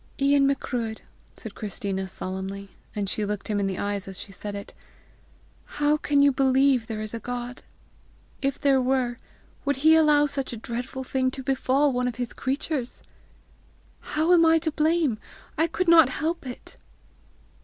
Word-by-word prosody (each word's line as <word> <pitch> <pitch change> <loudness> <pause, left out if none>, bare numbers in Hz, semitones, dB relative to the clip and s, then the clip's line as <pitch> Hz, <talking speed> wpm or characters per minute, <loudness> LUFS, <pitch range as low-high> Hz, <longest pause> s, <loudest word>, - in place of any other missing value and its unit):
"Ian 275 0 +4
Macruadh," 240 -5 -2 0.3
said 220 - -9
Christina 195 -2 -4
solemnly, 190 +1 -4 0.2
and 205 -2 -2
she 210 - -1
looked 205 +1 -4
him 210 -1 0
in 200 - 0
the 190 -1 -3
eyes 200 -1 -2
as 190 -1 -7
she 200 - -7
said 200 +2 -5
it, 200 - -8 1.0
"how 295 +1 +3
can 290 -1 +2
you 285 - +6
believe 265 -2 +3
there 215 -1 -4
is 215 - -6
a 230 - -3
God? 245 +1 -5 0.8
If 275 0 -1
there 275 -2 +3
were, 250 -2 0 0.5
would 285 0 +1
he 315 - +8
allow 300 -2 +5
such 275 -3 -3
a - - -5
dreadful 245 +4 -5
thing 260 0 0
to 265 +1 -7
befall 270 +1 +2
one 250 0 0
of 245 - -3
his 245 -1 -4
creatures? 270 -1 -3 1.0
How 315 +3 +1
am 340 -1 +6
I 325 0 +5
to 315 - +1
blame? 305 -6 +1 0.4
I 325 +2 +2
could 365 +2 -2
not 325 -5 +7
help 315 +2 -3
it!" 245 - -9
255 Hz, 170 wpm, -25 LUFS, 215-285 Hz, 1.0 s, he